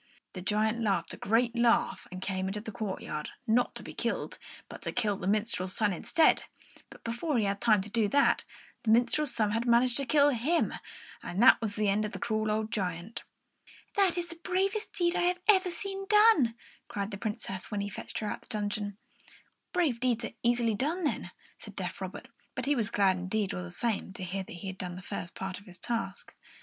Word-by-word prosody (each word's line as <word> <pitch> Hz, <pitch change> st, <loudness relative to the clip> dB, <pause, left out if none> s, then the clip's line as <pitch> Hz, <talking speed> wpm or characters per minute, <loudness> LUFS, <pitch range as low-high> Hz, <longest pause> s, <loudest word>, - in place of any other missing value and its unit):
The 185 Hz, -, -6 dB
giant 215 Hz, +4 st, +1 dB
laughed 195 Hz, -6 st, 0 dB
a -, -, -5 dB
great 230 Hz, +3 st, +2 dB
laugh 235 Hz, 0 st, +2 dB
and 185 Hz, +1 st, -6 dB
came 190 Hz, -1 st, -1 dB
out 195 Hz, +2 st, -2 dB
into -, -, -4 dB
the 220 Hz, -, -6 dB
courtyard, 190 Hz, -7 st, -4 dB, 0.2 s
not 240 Hz, +1 st, +2 dB
to -, -, -6 dB
be -, -, -8 dB
killed, -, -, -2 dB, 0.3 s
but -, -, -10 dB
to -, -, -2 dB
kill 215 Hz, -4 st, +1 dB
the 185 Hz, -, -5 dB
minstrel's 205 Hz, -3 st, 0 dB
son 210 Hz, -3 st, +2 dB
instead; 315 Hz, -, +3 dB, 0.4 s
but -, -, -14 dB
before 240 Hz, +5 st, -1 dB
he 220 Hz, -, +2 dB
had 200 Hz, 0 st, -1 dB
time 215 Hz, -5 st, +4 dB
to -, -, -9 dB
do 220 Hz, -1 st, +2 dB
that, 280 Hz, +6 st, +3 dB, 0.4 s
the 225 Hz, -, -2 dB
minstrel's 240 Hz, +6 st, +4 dB
son 215 Hz, -3 st, +2 dB
had 230 Hz, +3 st, 0 dB
managed 240 Hz, +1 st, +4 dB
to 275 Hz, -2 st, -1 dB
kill 290 Hz, -1 st, +5 dB
him, 285 Hz, +7 st, +1 dB, 0.5 s
and 190 Hz, +6 st, -1 dB
there 260 Hz, -, +10 dB
was 215 Hz, -2 st, -3 dB
an 215 Hz, -, +1 dB
end 205 Hz, +1 st, +2 dB
of 210 Hz, +1 st, -3 dB
the -, -, -5 dB
cruel 215 Hz, -1 st, 0 dB
old 215 Hz, +1 st, -1 dB
giant. 180 Hz, +2 st, -3 dB, 0.7 s
"That 385 Hz, -3 st, +3 dB
is 350 Hz, -, 0 dB
the 335 Hz, -1 st, -10 dB
bravest 390 Hz, +4 st, 0 dB
deed 345 Hz, -1 st, +1 dB
I -, -, +2 dB
have 360 Hz, 0 st, +1 dB
ever 380 Hz, -3 st, +6 dB
seen 390 Hz, +3 st, -5 dB
done!" 420 Hz, -, +6 dB, 0.3 s
cried 200 Hz, +1 st, -3 dB
the 195 Hz, -, -6 dB
Princess, 205 Hz, -3 st, -4 dB
when 205 Hz, -1 st, -2 dB
he 200 Hz, -, -2 dB
fetched 200 Hz, -, -7 dB
her 215 Hz, -, -2 dB
out -, -, -2 dB
of -, -, -24 dB
her 215 Hz, -, -1 dB
dungeon. 205 Hz, -1 st, -3 dB, 0.7 s
"Brave 315 Hz, -10 st, +1 dB
deeds 240 Hz, -2 st, +1 dB
are -, -, -5 dB
easily 235 Hz, -1 st, +3 dB
done, 305 Hz, -, -1 dB
then," 295 Hz, -, -1 dB, 0.3 s
said -, -, -11 dB
deaf -, -, -4 dB
Robert; -, -, -6 dB, 0.3 s
but -, -, -2 dB
he 290 Hz, +1 st, +3 dB
was 225 Hz, -5 st, 0 dB
glad 190 Hz, -2 st, +3 dB
enough, 215 Hz, -3 st, 0 dB
all 90 Hz, -, -3 dB
the 90 Hz, -, -6 dB
same, 215 Hz, -, -2 dB
to 190 Hz, -, -6 dB
hear 190 Hz, +2 st, -2 dB
that 190 Hz, -, -10 dB
he 175 Hz, +3 st, -8 dB
had 190 Hz, -1 st, -5 dB
done 180 Hz, -1 st, -4 dB
the 180 Hz, -, -9 dB
first 175 Hz, -, -6 dB
part 190 Hz, -1 st, -4 dB
of 200 Hz, -, -19 dB
his 180 Hz, -1 st, -12 dB
task. 230 Hz, +2 st, -4 dB
220 Hz, 225 wpm, -30 LUFS, 200-260 Hz, 0.7 s, there